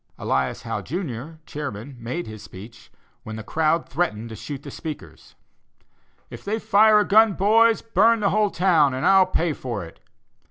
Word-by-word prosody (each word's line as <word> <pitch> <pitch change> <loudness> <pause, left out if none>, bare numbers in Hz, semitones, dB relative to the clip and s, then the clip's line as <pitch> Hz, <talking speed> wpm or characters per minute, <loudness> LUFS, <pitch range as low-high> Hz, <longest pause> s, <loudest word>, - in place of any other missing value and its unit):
Elias 65 -1 -2
Howe, - - -4
Jr., 150 - -5
chairman, 140 -4 -7
made 125 +10 -4
his 110 -1 -10
speech, 105 +5 -13 0.3
when 110 -3 -8
the 110 - -7
crowd 160 +6 0
threatened 115 -7 -2
to 110 - -8
shoot 140 +4 -8
the - - -9
speakers: 155 -3 -9 1.0
'If - - -10
they 210 +2 -2
fire 215 0 +4
a - - 0
gun, 220 0 +5
boys, 220 +4 +3
burn 230 +1 +3
the 200 - +2
whole 210 0 +2
town, 165 -8 +2
and 130 - -3
I'll 190 -1 +5
pay 170 -3 0
for 120 -10 -5
it! 80 - -15
160 Hz, 170 wpm, -23 LUFS, 120-200 Hz, 1.0 s, gun